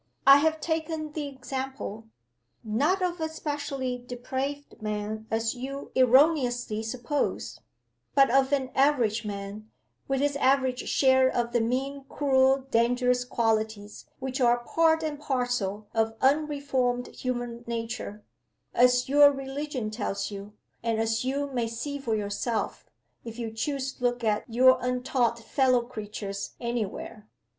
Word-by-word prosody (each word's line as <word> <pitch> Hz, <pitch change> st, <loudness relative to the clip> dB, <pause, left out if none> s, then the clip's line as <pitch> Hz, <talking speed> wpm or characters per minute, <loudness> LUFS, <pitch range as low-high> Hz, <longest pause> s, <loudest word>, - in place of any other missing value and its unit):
I 275 Hz, +1 st, +10 dB
have 315 Hz, +2 st, +1 dB
taken 320 Hz, -1 st, -2 dB
the 295 Hz, -1 st, -4 dB
example 265 Hz, -4 st, -5 dB, 0.6 s
not 285 Hz, -, +1 dB
of 350 Hz, -2 st, -1 dB
a 315 Hz, -, -1 dB
specially 285 Hz, -5 st, -3 dB
depraved 260 Hz, +3 st, -5 dB
man, 215 Hz, +1 st, -4 dB
as 225 Hz, 0 st, 0 dB
you 270 Hz, +2 st, -6 dB
erroneously 255 Hz, -4 st, +3 dB
suppose 245 Hz, +5 st, -2 dB, 0.6 s
but 275 Hz, -3 st, +6 dB
of 270 Hz, +1 st, +3 dB
an 265 Hz, -2 st, 0 dB
average 240 Hz, -6 st, +2 dB
man, 205 Hz, +1 st, -6 dB, 0.4 s
with 270 Hz, -1 st, 0 dB
his 285 Hz, 0 st, +1 dB
average 260 Hz, -2 st, +1 dB
share 260 Hz, -1 st, +4 dB
of 240 Hz, -2 st, -1 dB
the 240 Hz, -1 st, +2 dB
mean, 270 Hz, +4 st, -2 dB
cruel, 265 Hz, -2 st, +3 dB
and 270 Hz, 0 st, -12 dB
dangerous 245 Hz, +2 st, +2 dB
qualities, 220 Hz, -3 st, -1 dB
which 265 Hz, +1 st, -4 dB
are 240 Hz, 0 st, +3 dB
part 320 Hz, +4 st, +2 dB
and 300 Hz, -2 st, -3 dB
parcel 245 Hz, -8 st, -1 dB
of 225 Hz, 0 st, +1 dB
unreformed 270 Hz, -3 st, +1 dB
human 240 Hz, -2 st, -4 dB
nature 230 Hz, -2 st, -4 dB, 0.5 s
as 250 Hz, 0 st, +4 dB
your 285 Hz, +1 st, +7 dB
religion 270 Hz, -4 st, -4 dB
tells 210 Hz, -2 st, -3 dB
you, 200 Hz, +1 st, -8 dB, 0.3 s
and 230 Hz, -1 st, 0 dB
as 225 Hz, +1 st, 0 dB
you 275 Hz, +2 st, -1 dB
may 240 Hz, -2 st, 0 dB
see 285 Hz, +6 st, -4 dB
for 230 Hz, -5 st, -1 dB
yourself, 210 Hz, +2 st, -3 dB, 0.3 s
if 230 Hz, -1 st, -8 dB
you 230 Hz, -2 st, -4 dB
choose 270 Hz, +3 st, -2 dB
to 250 Hz, -, -14 dB
look 245 Hz, 0 st, +1 dB
at 215 Hz, -1 st, +1 dB
your 255 Hz, +2 st, +6 dB
untaught 250 Hz, -1 st, 0 dB
fellow 250 Hz, +1 st, +2 dB
creatures 210 Hz, -4 st, -6 dB
any 235 Hz, -3 st, -1 dB
where. 210 Hz, +2 st, -9 dB
250 Hz, 140 wpm, -27 LUFS, 225-275 Hz, 0.6 s, I